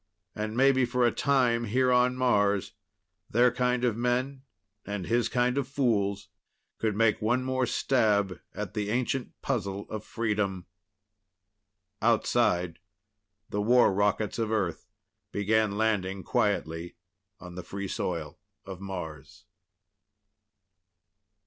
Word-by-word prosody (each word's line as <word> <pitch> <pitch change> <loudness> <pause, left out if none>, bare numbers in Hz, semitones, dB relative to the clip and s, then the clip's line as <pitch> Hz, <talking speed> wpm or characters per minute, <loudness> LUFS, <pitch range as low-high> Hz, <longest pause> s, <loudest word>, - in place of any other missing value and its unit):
And 110 +1 -4
maybe 135 0 +4
for 125 0 +1
a 120 - +4
time 125 -4 +2
here 125 +4 +2
on 125 0 +3
Mars 105 -6 +2 0.6
their 120 +2 +4
kind 125 0 0
of 120 -4 +2
men 125 +3 -1 0.4
and 100 -3 -4
his 120 +5 +1
kind 125 +2 +1
of 135 - -3
fools 105 -7 0 0.5
could 110 -2 0
make 110 0 +2
one 120 +4 +1
more 130 -1 0
stab 105 -9 +1
at 105 -2 -6
the 105 -2 -2
ancient 125 +2 -2
puzzle 100 -6 -2
of 110 -1 -4
freedom. 105 -5 -2 1.4
Outside 110 -6 +2 0.7
the 105 - -1
war 120 0 +5
rockets 105 +2 0
of 110 -1 -1
Earth 95 -6 -1 0.4
began 105 0 +1
landing 100 -4 0
quietly 85 -5 -1 0.4
on 90 -1 -10
the 90 - -6
free 100 +2 -6
soil 85 -4 -4 0.3
of 95 -1 -8
Mars. 85 -7 -7
110 Hz, 120 wpm, -28 LUFS, 100-125 Hz, 1.4 s, war